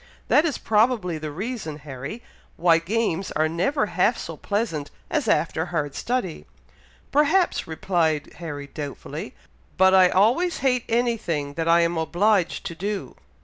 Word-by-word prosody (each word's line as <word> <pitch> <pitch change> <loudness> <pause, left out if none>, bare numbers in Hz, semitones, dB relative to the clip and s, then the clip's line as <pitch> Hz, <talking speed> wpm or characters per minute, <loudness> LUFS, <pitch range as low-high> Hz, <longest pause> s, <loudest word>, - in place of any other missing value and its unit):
That 300 - +5
is 310 - -1
probably 210 -6 +1
the 155 0 -5
reason, 185 - -5
Harry, 145 - -8 0.3
why 165 -1 +4
games 195 0 -1
are 155 +1 +2
never 180 - 0
half - - +1
so - - -6
pleasant 200 -9 -2 0.2
as 300 -7 0
after 165 -4 +1
hard 150 -5 -2
study." 235 - -3 0.6
"Perhaps," 315 +6 +2
replied 160 -2 0
Harry, 150 -4 -6
doubtfully; 145 0 -7 0.4
"but 190 0 +5
I 185 -1 +7
always 245 - +3
hate 250 -2 +2
any 235 0 +2
thing 145 -8 -3
that 165 +2 -2
I 170 +1 +5
am 170 0 +1
obliged 185 +3 +1
to - - -4
do." 200 +4 -4
180 Hz, 145 wpm, -24 LUFS, 160-230 Hz, 0.6 s, I